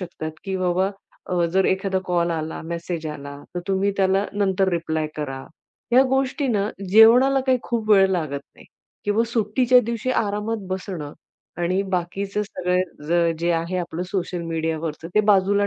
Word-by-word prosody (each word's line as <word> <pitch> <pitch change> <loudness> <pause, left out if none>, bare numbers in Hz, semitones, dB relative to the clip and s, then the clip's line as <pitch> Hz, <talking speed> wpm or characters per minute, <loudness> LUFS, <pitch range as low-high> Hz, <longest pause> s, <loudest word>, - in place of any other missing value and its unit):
शकतात, 170 -3 -5
की 190 -1 -2
बाबा 185 +1 +1 0.4
अ, 180 -2 +1
जर 190 +3 +2
एखादा 190 0 +1
कॉल 175 -1 +1
आला, 160 -1 -4
मेसेज 170 0 -4
आला, 140 -1 -7 0.2
तर 175 - -2
तुम्ही 195 +1 +2
त्याला 195 +1 +2
नंतर 195 -1 +1
रिप्लाय 160 -2 -1
करा. 135 -3 -4 0.5
ह्या 255 +2 +7
गोष्टींना 260 -5 0 0.2
जेवणाला 245 +6 +7
काही 260 -1 +3
खूप 225 -2 -2
वेळ 195 -2 +6
लागत 155 -6 -1
नाही. - - -16 0.4
किंवा 205 +2 +2
सुट्टीच्या 235 +3 +3
दिवशी 235 +2 -2
आरामात 210 -1 -1
बसणं 185 -6 -4 0.5
आणि 185 +3 +1
बाकीचं 195 +4 -2
सगळं 175 -3 0
जे 170 +1 0
आहे, 170 +2 -1
आपलं 175 -1 -4
सोशल 180 -2 -2
मीडियावरचं 160 -1 -3
ते 215 - +6
बाजूला 200 +1 +3
185 Hz, 150 wpm, -23 LUFS, 170-205 Hz, 0.5 s, ह्या